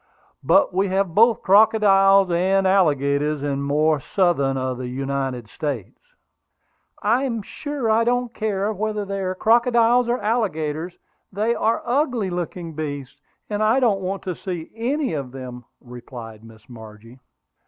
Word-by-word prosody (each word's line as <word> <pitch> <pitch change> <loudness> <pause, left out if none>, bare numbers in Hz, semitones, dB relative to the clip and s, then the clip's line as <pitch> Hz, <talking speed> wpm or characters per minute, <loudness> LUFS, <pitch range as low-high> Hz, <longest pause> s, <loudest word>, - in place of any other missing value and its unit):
But 285 -10 +3
we 195 +2 +1
have 190 -2 -1
both 225 +3 +4
crocodiles 195 -2 +5
and 190 +3 +2
alligators 150 -5 +1
in 145 - -1
the - - -1
more 150 +2 +1
southern 140 -4 0
of 130 -1 -3
the 125 - -5
United 135 -2 -3
States." 130 - -5 1.0
"I 235 +6 +2
am 230 -5 -2
sure 290 +1 -5
I 220 +1 +3
don't 245 0 0
care 210 -1 -2
whether 210 0 -3
they 195 0 -4
are 185 -1 -2
crocodiles 235 +2 +3
or 240 - +1
alligators; 175 -7 -2 0.3
they 215 +4 0
are 225 -1 0
ugly 245 - 0
looking 175 -1 -5
beasts, 145 -3 -6 0.3
and 210 0 -3
I 220 +4 +3
don't 215 -7 +2
want 190 +1 -4
to 185 - -3
see 175 -3 -6
any 260 - -2
of 140 -4 -4
them," 125 -2 -8
replied 120 -3 -11
Miss 110 -1 -16
Margie. 115 +1 -13
185 Hz, 150 wpm, -22 LUFS, 140-220 Hz, 1.0 s, crocodiles